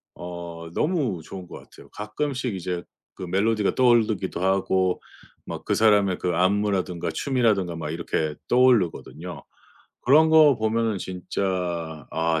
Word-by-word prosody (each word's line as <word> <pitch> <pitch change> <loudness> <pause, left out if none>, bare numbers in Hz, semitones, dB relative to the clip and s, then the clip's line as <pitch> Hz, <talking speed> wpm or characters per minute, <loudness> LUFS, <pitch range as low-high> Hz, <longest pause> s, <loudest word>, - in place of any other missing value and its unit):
어 85 -1 -8
너무 145 - 0
좋은 90 +2 -9
것 - - -10
같아요. - - -16
가끔씩 125 +3 -3
이제 90 -1 -4 0.3
그 - - -8
멜로디가 100 +3 +1
떠오르기도 110 -8 +2
하고 95 -1 +1 0.4
막 - - -7
그 - - 0
사람의 105 -4 +3
그 90 -2 -1
안무라든가 95 -1 0
춤이라든가 110 -10 0
막 80 -2 -5
이렇게 80 -2 -2
떠오르거든요. 100 -8 +1 0.6
그런 155 +5 +5
거 155 -4 +6
보면은 110 -1 0
진짜 90 -4 -3
아 80 0 0
95 Hz, 295 characters per minute, -24 LUFS, 85-115 Hz, 0.6 s, 거